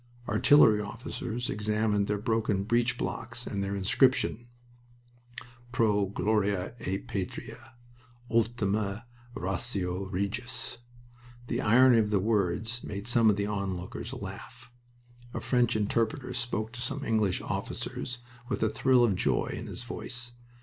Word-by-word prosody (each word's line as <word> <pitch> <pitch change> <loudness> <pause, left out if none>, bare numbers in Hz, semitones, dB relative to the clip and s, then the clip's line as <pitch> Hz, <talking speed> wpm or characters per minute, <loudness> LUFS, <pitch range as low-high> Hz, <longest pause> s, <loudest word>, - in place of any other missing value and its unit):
Artillery 110 0 +6
officers 115 +2 -4
examined 105 -1 +1
their 105 - 0
broken 110 -2 0
breech 120 +2 +1
blocks 120 0 -4
and 100 -1 -2
their 100 0 -2
inscriptions: 120 +4 +2 1.2
"Pro 105 -4 +2
Gloria 100 -1 0
et 95 -3 -3
Patria." 100 +6 -6 0.5
"Ultima 110 -2 0 0.3
ratio 95 -1 -2
regis." 100 +6 -3 0.7
The 120 +1 -1
irony 125 +1 +6
of 105 -1 +2
the 105 -2 +2
words 110 +3 0
made 100 0 -5
some 115 -2 +4
of 105 - +4
the 100 0 -1
onlookers 95 -3 -4
laugh. 125 - -9 0.6
A - - -1
French 125 -2 +2
interpreter 115 +4 0
spoke 120 -3 -2
to 120 0 -8
some 140 +2 -2
English 110 -6 +2
officers 125 -1 -4 0.3
with - - -1
a 110 - +3
thrill 125 +2 +4
of 115 -4 +4
joy 70 -8 0
in - - -6
his - - -5
voice. 120 0 -6
110 Hz, 130 wpm, -29 LUFS, 100-120 Hz, 1.2 s, Artillery